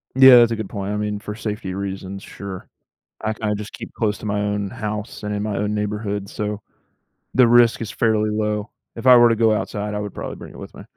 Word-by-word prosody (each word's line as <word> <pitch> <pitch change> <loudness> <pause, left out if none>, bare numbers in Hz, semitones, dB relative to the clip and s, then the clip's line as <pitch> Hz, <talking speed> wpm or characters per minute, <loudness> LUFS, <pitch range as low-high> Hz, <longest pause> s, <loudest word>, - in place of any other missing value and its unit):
Yeah, 130 -1 +9
that's 120 -1 +6
a - - +1
good 110 -3 -5
point, 100 -1 -4
I - - -1
mean, 105 0 -2
for 105 0 -6
safety 105 -4 -4
reasons, 95 0 -5
sure. 95 -2 -8 0.5
I 110 - -1
can 110 - -14
I - - +1
just 105 +1 -7
keep - - -8
close 105 -2 -1
to - - -9
my 105 -1 -1
own 105 -1 -1
house 105 +1 -5
and 105 0 -2
in 105 - -2
my 105 -2 -2
own 105 +1 -1
neighborhood, 105 -1 -3
so 105 0 -4 0.7
the 125 -2 +6
risk 120 -1 +5
is 110 -3 -4
fairly 110 -2 +1
low. 105 0 -1 0.2
If 115 - -7
I 125 -1 +9
were 120 -1 +7
to 115 - +2
go 110 0 +4
outside 105 0 -3
I - - -1
would 105 -2 -6
probably - - -6
bring - - -11
it - - -13
with - - -10
me. - - -10
105 Hz, 245 wpm, -21 LUFS, 105-110 Hz, 0.7 s, Yeah